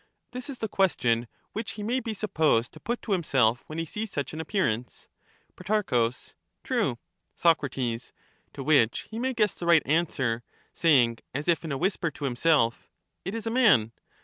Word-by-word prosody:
' - - -51
This 250 +3 -6
is 270 - -5
the 220 - -2
question 120 - +1 0.3
which 220 +1 -4
he 210 - -6
may 240 +5 0
be 225 -3 -4
supposed 155 - +1
to - - -12
put 240 +2 -3
to 220 - -5
himself 130 - +2
when 155 - -7
he 165 - -1
sees 210 +6 -5
such 140 -3 -3
an 160 - -4
appearance. 125 - -2 0.5
Pro. 210 +4 0 0.8
True. - - 0 0.4
Soc. 170 -1 +4
To 125 +2 -6
which 135 -6 +4
he 220 - -4
may 260 +1 -1
guess 210 -4 +2
the 170 - -6
right 170 -2 +6
answer, 135 -7 0 0.3
saying 125 -8 +3 0.2
as 145 +4 -3
if 170 -1 +2
in 160 - -4
a 135 - -1
whisper 180 0 0
to 145 -1 -6
himself—' 125 -2 +2 0.3
It 195 +4 -4
is 230 - -5
a 225 - -1
man.' 210 - +4
165 Hz, 180 wpm, -27 LUFS, 130-210 Hz, 0.8 s, right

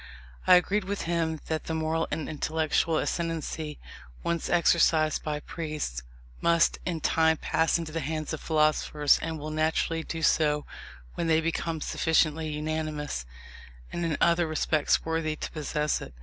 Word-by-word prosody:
I - - +9
agreed 190 +3 +2
with 200 +1 -3
him 165 -2 -1
that 160 -1 -3
the 160 - -2
moral 160 +1 0
and 160 - -3
intellectual 155 +1 0
ascendancy, 160 -3 -2 0.5
once 170 -1 -1
exercised 165 -2 +3
by 150 -1 -3
priests, 150 - -4 0.4
must 170 -1 +3
in 165 -3 -2
time 160 +1 +3
pass 160 +3 +1
into 165 -2 -5
the 165 - -2
hands 155 +1 -3
of 155 - -5
philosophers, 155 -2 +2
and 165 -1 -3
will 155 +1 -6
naturally 160 +1 0
do 160 0 -5
so 150 -2 +3 0.5
when 170 - -2
they 160 -1 +4
become 165 -1 -2
sufficiently 160 0 +1
unanimous, 150 - -3 0.7
and 175 - -2
in 165 -3 0
other 170 0 +3
respects 155 -1 +1
worthy 160 -1 -1
to - - -6
possess 150 -1 -1
it. - - -9
160 Hz, 150 wpm, -28 LUFS, 155-165 Hz, 0.7 s, I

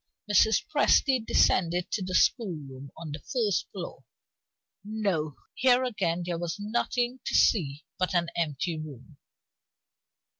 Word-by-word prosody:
Mrs. 210 +2 +4
Presty 275 -4 +3
descended 175 -4 +2
to 215 - -1
the 185 0 -3
schoolroom 145 - 0
on 160 -2 -7
the 150 - -5
first 225 - -1
floor. - - -7 0.8
No. 195 -9 -2 0.2
Here 255 0 +3
again 180 -8 -1
there 170 -1 -3
was 170 -1 -3
nothing 240 +4 -1
to - - -2
see 150 -8 +2
but 185 0 0
an 170 -1 +1
empty 160 0 -2
room. 145 -2 -10
180 Hz, 125 wpm, -28 LUFS, 155-220 Hz, 0.8 s, Mrs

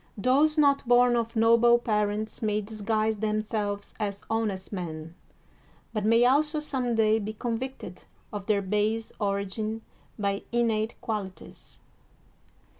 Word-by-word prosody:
Those 280 +8 +3
not 280 -3 +3
bom 245 0 +5
of 230 -1 -2
noble 230 +1 +5
parents 210 -2 -1
may 210 -1 +1
disguise 215 +1 -1
themselves 215 -1 -2
as 200 -2 -3
honest 215 -4 -2
men, 165 -3 -6 0.8
but 215 -2 -2
may 230 +2 +5
also 300 +4 +3
some 255 -5 -1
day 220 0 +3
be 215 +1 -4
convicted 235 -4 -5 0.3
of 205 -2 -6
their 205 -2 +2
base 210 +3 -1
origin 205 +2 -2 0.3
by 200 -1 -1
innate 230 -2 0
qual 215 -4 -2
ities. 185 - -15
220 Hz, 125 wpm, -27 LUFS, 205-235 Hz, 0.8 s, bom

